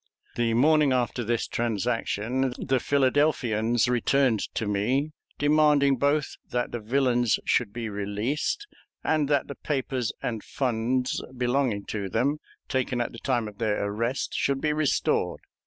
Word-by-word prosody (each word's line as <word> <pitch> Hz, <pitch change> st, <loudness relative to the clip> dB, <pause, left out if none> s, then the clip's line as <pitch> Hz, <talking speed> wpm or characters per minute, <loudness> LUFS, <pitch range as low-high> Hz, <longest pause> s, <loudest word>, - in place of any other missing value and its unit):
The 115 Hz, -1 st, +1 dB
morning 150 Hz, +2 st, +4 dB
after 120 Hz, -1 st, 0 dB
this 115 Hz, +1 st, -1 dB
transaction 120 Hz, +2 st, -1 dB
the 130 Hz, -1 st, 0 dB
Philadelphians 125 Hz, -5 st, +2 dB
returned 125 Hz, -1 st, +2 dB, 0.2 s
to 110 Hz, -, -1 dB
me, 125 Hz, +9 st, 0 dB, 0.3 s
demanding 145 Hz, -2 st, +4 dB
both 145 Hz, +3 st, +1 dB
that 125 Hz, 0 st, -1 dB
the 120 Hz, -, -3 dB
villains 120 Hz, 0 st, +2 dB
should 115 Hz, -5 st, +1 dB
be 115 Hz, 0 st, -4 dB
released, 105 Hz, -, -2 dB, 0.4 s
and 150 Hz, -3 st, +1 dB
that 145 Hz, -2 st, +2 dB
the -, -, -5 dB
papers 135 Hz, -5 st, -2 dB
and 115 Hz, -3 st, -3 dB
funds 125 Hz, 0 st, -1 dB
belonging 125 Hz, -4 st, 0 dB
to 100 Hz, -3 st, -3 dB
them, 140 Hz, +9 st, 0 dB, 0.3 s
taken 130 Hz, -2 st, -1 dB
at 120 Hz, -, -1 dB
the 115 Hz, -, -10 dB
time 120 Hz, -5 st, 0 dB
of 105 Hz, -1 st, -11 dB
their 105 Hz, -3 st, 0 dB
arrest, 115 Hz, +6 st, -2 dB
should 140 Hz, -1 st, 0 dB
be 150 Hz, +1 st, 0 dB
restored. 150 Hz, -2 st, 0 dB
125 Hz, 140 wpm, -26 LUFS, 115-140 Hz, 0.4 s, morning